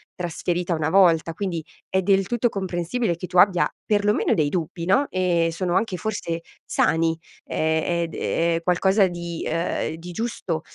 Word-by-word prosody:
trasferita 175 0 -2
una 155 -1 0
volta. 165 -3 +4
Quindi 175 -3 -3 0.3
è 190 - +1
del 195 +1 +3
tutto 240 +2 +1
comprensibile 185 0 -2
che 180 - -6
tu 180 - -3
abbia 180 -2 +5 0.2
perlomeno 210 0 +2
dei 155 -2 +2
dubbi 170 +1 -3
no, 230 +11 +3
e 175 -3 +1
sono 175 +1 -2
anche 195 -1 0
forse 170 -5 -3 0.2
sani 165 0 +1 0.3
e - - -6 0.3
e 170 -1 0
ed 165 -1 -6
è 165 0 0
qualcosa 190 +3 +3
di, 170 -1 -5
ehm, 165 -1 -1
di 175 +2 -9
giusto 180 -6 -3
175 Hz, 160 wpm, -23 LUFS, 165-195 Hz, 0.3 s, abbia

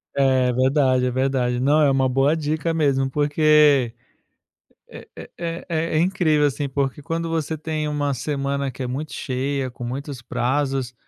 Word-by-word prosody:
É, 130 -2 +3
verdade. 130 0 +2
É 125 - 0
verdade. 130 -1 0
Não, 145 +4 +3
é 145 - +4
uma 135 -1 +2
boa 135 +4 +2
dica 155 +1 -2
mesmo, 140 -4 +1
porque 145 -3 +3 1.0
é - - -11
é - - -10
é 170 0 -5
é 165 -1 -1
é - - +3
incrível, 155 -4 +2
assim. 145 0 -2
Porque 135 +1 -2
quando 165 +2 -3
você 160 -1 -2
tem 155 0 -3
uma 145 -1 -1
semana 140 +1 -2
que 130 +1 -8
é - - -2
muito 140 +5 -5
cheia, 135 0 -2
com 120 - -12
muitos 135 +2 -5
prazos, 130 +1 -1
140 Hz, 170 wpm, -22 LUFS, 130-155 Hz, 1.0 s, é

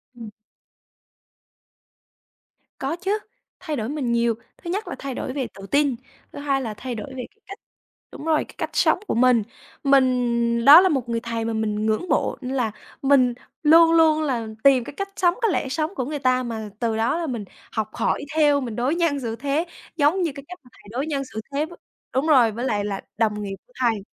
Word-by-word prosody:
Ừm. 230 -3 -8 2.5
Có 275 +5 -2
chứ, 390 +4 -1 0.4
thay 305 - -4
đổi 225 0 -3
mình 280 -5 -2
nhiều. 235 -1 +2 0.2
Thứ 340 - -8
nhất 410 +5 -2
là - - -4
thay 270 -2 -5
đổi 260 - -4
về 270 -4 -2
tự 195 0 -10
tin, 285 -3 +2 0.4
thứ - - -8
hai 275 -2 0
là 220 -4 -4
thay 245 +2 -6
đổi 215 - -6
về 260 -2 -6
cái - - -37
cách 395 - -9 0.5
đúng 300 - -9
rồi, 315 -1 +2
cái - - -17
cách - - -3
sống - - +3
của - - -1
mình. 245 -2 +4 0.4
Mình 245 -4 +2
đó 305 +5 +11
là 375 - +3
một 260 -6 -1
người 230 0 0
thầy 230 -1 -3
mà 230 - -1
mình 215 -1 -1
ngưỡng 220 +10 0
mộ, - - +1
nên 260 +1 -4
là 230 -4 0 0.3
mình 265 -3 +4 0.3
luôn 330 +2 +7
luôn 320 -1 +5
là 245 -7 -1 0.2
tìm 265 -3 +6
cái - - -9
cách 395 0 -4
sống, 355 -1 +2
cái 450 -4 +3
lẽ 275 - -1
sống 315 +6 -2
của 255 - -2
người 295 0 -4
ta 255 -1 +2
mà 220 -3 -5
từ 225 -2 0
đó 230 +8 +1
là 335 -2 -2
mình 230 -6 -4 0.3
học 215 -1 -2
hỏi - - 0
theo, 290 -2 +4
mình 235 -4 -5
đối 260 +7 0
nhân 330 -5 +1
xử 230 -3 -3
thế 285 +6 -1 0.3
giống 315 +5 +3
như 330 -4 0
cái 280 - -8
cách 360 0 -10
mà 250 - -19
thầy - - -20
đối 265 +5 -2
nhân 280 -3 -1
xử 220 - -4
thế 295 +2 +1
với 345 +1 -13 0.4
đúng 270 +5 +1
rồi, 250 -7 +5
với 240 +4 -4
lại 205 -4 0
là 195 -2 -3 0.2
đồng 210 -2 +1
nghiệp 195 -1 -4
của - - -28
thầy. 230 -5 +1
260 Hz, 220 wpm, -23 LUFS, 230-305 Hz, 2.5 s, đó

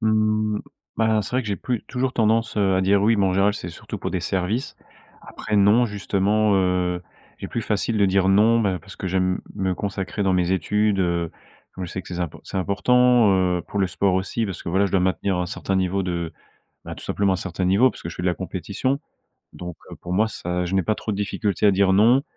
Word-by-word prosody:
Mmh, 110 -1 +1 0.4
ben, 110 -1 +2
c'est - - -7
vrai 130 +1 0
que 110 - -7
j'ai 100 - -1
plus 125 -3 -3
toujours 130 0 -2
tendance, 115 0 +1
heu, 95 -2 +2
à 95 - +2
dire 100 +1 +3
oui, 110 +2 +4
mais 100 -1 +2
en 95 - +1
général 100 +2 +2
c'est 90 - -6
surtout 85 - -8
pour - - -4
des - - -2
services. 100 +8 -2 0.5
Après 105 - -4
non, 105 +5 +5
justement, 105 0 +1
heu, 90 -1 +1 0.4
il - - -6
est - - -4
plus 115 - -3
facile 110 +2 -1
de 100 - +4
dire 95 0 +2
non, 110 +4 +4
ben, 95 -4 0
parce 100 - -13
que 95 - -5
j'aime 95 0 0
me 95 -1 -1
consacrer 100 +1 -3
dans 95 -1 +2
mes 90 0 +1
études, 105 +3 +1
heu. 85 -2 0 0.4
Comme 95 -1 -6
je - - -9
sais 95 - -4
que - - -20
c'est 90 - -6
zim 90 -1 -2 0.2
c'est - - -6
important, 120 +4 +3
heu, 90 -2 +1
pour 100 - -4
le 95 - +3
sport 95 +1 +1
aussi 95 +4 -1
parce 95 -3 -6
que, - - -6
voilà, 95 +3 +2
je - - -7
dois 95 - +3
maintenir 95 +1 0
un 90 - -1
certain 95 +2 -3
niveau 95 +1 0
de, 85 -2 -3 0.5
ben, - - -7
tout - - -11
simplement 100 -1 +1
un - - +1
certain 90 0 -3
niveau, 100 +8 +4
parce - - -12
que 85 - -5
je - - -9
fais 90 - -5
de - - +1
la 90 - +2
compétition. 100 +9 -3 0.6
Donc, 90 -2 -7
heu, - - -9
pour 90 - -6
moi, 110 +4 +2
ça, 90 -4 -3
je 95 - -3
n'ai 95 - +3
pas 110 - 0
trop 110 - -5
de - - -3
difficultés 105 0 -2
à - - +7
dire 95 0 +3
non. 120 +7 +5
100 Hz, 245 wpm, -23 LUFS, 90-110 Hz, 0.6 s, à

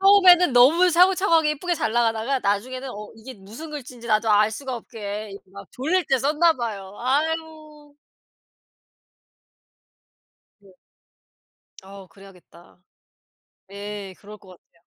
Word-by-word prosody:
처음에는 370 -5 +6
너무 305 +9 +5
차곡차곡하게 345 -3 +3
이쁘게 350 +4 -3
잘 225 - -2
나가다가 235 +2 0
나중에는 255 +5 -3
어 210 -2 -9
이게 245 +4 -11
무슨 220 +11 -11
글씨인지 250 -5 -9
나도 215 0 +1
알 210 +1 +4
수가 260 +4 -6
없게 210 -2 -7
이게 195 - -9
막 200 0 -11
졸릴 335 +8 -1
때 265 - +2
썼나 305 +6 +2
봐요. 205 -6 -6
아유. 305 +2 -3 2.7
네. 200 -1 -21 1.1
어 195 0 -13
그래야겠다. 180 -2 -19 0.9
예 200 -1 -8
그럴 210 +1 -13
것 195 - -20
같아요. 170 -1 -22
240 Hz, 265 characters per minute, -23 LUFS, 205-305 Hz, 2.7 s, 처음에는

